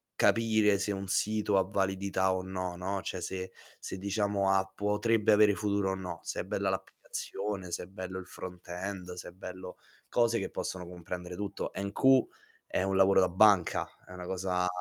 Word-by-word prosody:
capire 110 Hz, -3 st, +4 dB
se 105 Hz, -, 0 dB
un 95 Hz, 0 st, -4 dB
sito 105 Hz, 0 st, +1 dB
ha 95 Hz, -, +5 dB
validità 95 Hz, -1 st, +1 dB
o 95 Hz, -, -1 dB
no, 90 Hz, -1 st, -3 dB
no. 95 Hz, +2 st, -2 dB
Cioè 90 Hz, -, -4 dB
se 95 Hz, +1 st, -4 dB, 0.3 s
se -, -, -6 dB
diciamo 100 Hz, 0 st, +1 dB
ha 95 Hz, 0 st, +3 dB
potrebbe 105 Hz, +2 st, +2 dB
avere 105 Hz, -1 st, +6 dB
futuro 100 Hz, -2 st, 0 dB
o 95 Hz, -, -1 dB
no, 90 Hz, -3 st, -6 dB
se -, -, -3 dB
è -, -, -5 dB
bella -, -, 0 dB
l'applicazione, 95 Hz, -3 st, -4 dB
se -, -, -2 dB
è -, -, -7 dB
bello 95 Hz, -1 st, -6 dB
il 95 Hz, -, -9 dB
front 90 Hz, -1 st, -9 dB
end, 90 Hz, 0 st, -5 dB
se 90 Hz, -, -7 dB
è -, -, -12 dB
bello 90 Hz, 0 st, -8 dB, 0.3 s
cose 120 Hz, -1 st, +3 dB
che -, -, -3 dB
possono 90 Hz, -2 st, -4 dB
comprendere 90 Hz, 0 st, -6 dB
tutto. 100 Hz, +1 st, -4 dB
NQ 115 Hz, +7 st, +4 dB, 0.4 s
è -, -, 0 dB
un 95 Hz, 0 st, 0 dB
lavoro 95 Hz, 0 st, +6 dB
da 90 Hz, -, +3 dB
banca, 95 Hz, -1 st, +4 dB, 0.2 s
è 90 Hz, -, -12 dB
una 90 Hz, -1 st, -7 dB
cosa 90 Hz, 0 st, 0 dB
95 Hz, 185 wpm, -31 LUFS, 90-100 Hz, 0.4 s, avere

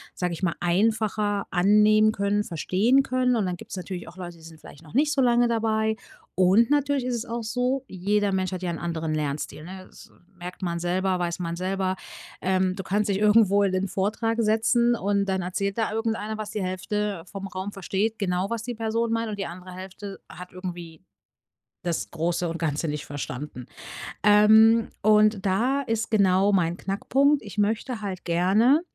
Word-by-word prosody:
sage 180 Hz, -1 st, -2 dB
ich 165 Hz, -, -7 dB
mal, 180 Hz, -3 st, 0 dB
einfacher 205 Hz, +2 st, +1 dB
annehmen 210 Hz, +3 st, +5 dB
können, 205 Hz, 0 st, 0 dB
verstehen 205 Hz, -, +2 dB
können. 255 Hz, -1 st, +1 dB
Und 215 Hz, -4 st, +1 dB
dann 180 Hz, -1 st, -3 dB
gibt's -, -, -9 dB
natürlich 185 Hz, -1 st, -6 dB
auch 180 Hz, -, -12 dB
Leute, 175 Hz, -2 st, -8 dB
die 165 Hz, -, -18 dB
sind 160 Hz, -1 st, -13 dB
vielleicht 150 Hz, -, -14 dB
noch 160 Hz, +2 st, -14 dB
nicht 295 Hz, +3 st, +3 dB
so 275 Hz, -, +2 dB
lange 240 Hz, -1 st, +4 dB
dabei. 220 Hz, -1 st, 0 dB, 0.4 s
Und 190 Hz, +5 st, +4 dB
natürlich 285 Hz, -2 st, +2 dB
ist 250 Hz, -1 st, -1 dB
es 235 Hz, 0 st, -4 dB
auch 235 Hz, 0 st, -4 dB
so: 250 Hz, +4 st, -1 dB
jeder 200 Hz, +2 st, 0 dB
Mensch 190 Hz, 0 st, -1 dB
hat 185 Hz, -1 st, -5 dB
ja 175 Hz, -, -1 dB
'n 165 Hz, -, -5 dB
anderen 165 Hz, -2 st, -3 dB
Lernstil, 150 Hz, 0 st, -3 dB
ne? 185 Hz, +2 st, -9 dB
Das -, -, -16 dB, 0.2 s
merkt 180 Hz, +1 st, -8 dB
man 170 Hz, -1 st, -2 dB
selber, 185 Hz, +2 st, 0 dB
weiß 170 Hz, -1 st, -2 dB
man 170 Hz, -1 st, -3 dB
selber. 185 Hz, +1 st, -1 dB, 0.5 s
Ähm, 185 Hz, 0 st, +1 dB
du 195 Hz, -, -5 dB
kannst 205 Hz, +2 st, 0 dB
dich 195 Hz, -, +1 dB
irgendwo 210 Hz, -1 st, +5 dB
in 195 Hz, -, +1 dB
den 185 Hz, +1 st, 0 dB
Vortrag 215 Hz, +4 st, -1 dB
setzen 235 Hz, +2 st, +3 dB
und 200 Hz, -1 st, 0 dB
dann 190 Hz, -1 st, -1 dB
erzählt 195 Hz, +3 st, -2 dB
da 225 Hz, -2 st, 0 dB
irgendeiner, 220 Hz, -1 st, -2 dB
was 215 Hz, -1 st, -5 dB
die 210 Hz, -, -3 dB
Hälfte 190 Hz, 0 st, -2 dB
vom 195 Hz, -1 st, -6 dB
Raum 190 Hz, +2 st, -6 dB
versteht 200 Hz, +3 st, -2 dB
genau, 185 Hz, -1 st, -1 dB
was 230 Hz, -1 st, -3 dB
die 240 Hz, 0 st, -5 dB
Person 225 Hz, +1 st, -1 dB
meint. 230 Hz, 0 st, -1 dB
Und 210 Hz, -, -5 dB
die 195 Hz, -, -2 dB
andere 180 Hz, +1 st, -10 dB
Hälfte 190 Hz, +2 st, -8 dB
hat 180 Hz, 0 st, -10 dB
irgendwie 175 Hz, -3 st, -7 dB, 0.8 s
das 170 Hz, -2 st, -2 dB
Große 170 Hz, +1 st, -1 dB
und 165 Hz, +1 st, -4 dB
Ganze 155 Hz, -1 st, -1 dB
nicht 150 Hz, -1 st, -4 dB
verstanden. 135 Hz, -2 st, -6 dB, 0.6 s
Ähm, 220 Hz, +2 st, +6 dB
und 215 Hz, -1 st, +4 dB
da 245 Hz, +9 st, +1 dB
ist 225 Hz, -3 st, -2 dB
genau 195 Hz, -1 st, +4 dB
mein 175 Hz, -4 st, +2 dB
Knackpunkt. 270 Hz, +10 st, +1 dB
Ich 205 Hz, -1 st, -10 dB
möchte 220 Hz, +3 st, -1 dB
halt 190 Hz, -3 st, -5 dB
gerne, 195 Hz, -, +3 dB
200 Hz, 190 wpm, -25 LUFS, 180-220 Hz, 0.8 s, Ähm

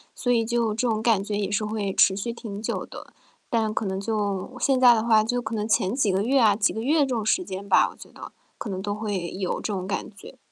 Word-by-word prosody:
所 245 Hz, -, -1 dB
以 230 Hz, -2 st, +2 dB
就 230 Hz, -2 st, 0 dB
这 240 Hz, +3 st, -1 dB
种 220 Hz, -1 st, 0 dB
感 220 Hz, -5 st, +3 dB
觉 205 Hz, 0 st, -3 dB
也 205 Hz, -1 st, -2 dB
是 210 Hz, +1 st, 0 dB
会 210 Hz, -3 st, -3 dB
持 190 Hz, -, +4 dB
续 220 Hz, +4 st, -3 dB
挺 210 Hz, -3 st, -7 dB
久 -, -, -3 dB
的， -, -, -12 dB, 0.4 s
但 220 Hz, -4 st, 0 dB
可 220 Hz, -, -2 dB
能 190 Hz, 0 st, -2 dB
就 205 Hz, +1 st, -2 dB
现 270 Hz, -2 st, +2 dB
在 245 Hz, -2 st, +8 dB
的 220 Hz, -, +1 dB
话 220 Hz, -2 st, +4 dB
就 245 Hz, +2 st, -1 dB
可 225 Hz, 0 st, -4 dB
能 210 Hz, 0 st, -2 dB
前 220 Hz, -1 st, +1 dB
几 220 Hz, -8 st, +2 dB
个 190 Hz, +1 st, +1 dB
月 265 Hz, +3 st, +2 dB
啊 210 Hz, -3 st, +5 dB
几 205 Hz, -, +2 dB
个 220 Hz, -, -4 dB
月 300 Hz, +6 st, +2 dB
这 -, -, +4 dB
种 220 Hz, -2 st, -2 dB
时 365 Hz, +11 st, +2 dB
间 195 Hz, +2 st, -7 dB
吧， -, -, +5 dB
我 -, -, -17 dB
觉 -, -, -13 dB
得 -, -, -11 dB, 0.2 s
可 215 Hz, -, -6 dB
能 190 Hz, -1 st, -4 dB
都 205 Hz, 0 st, -3 dB
会 205 Hz, -5 st, -3 dB
有 185 Hz, -1 st, -3 dB
这 210 Hz, -, -3 dB
种 185 Hz, -1 st, -4 dB
感 200 Hz, -, -3 dB
觉。 255 Hz, +6 st, -13 dB
215 Hz, 290 characters per minute, -25 LUFS, 200-230 Hz, 0.4 s, 在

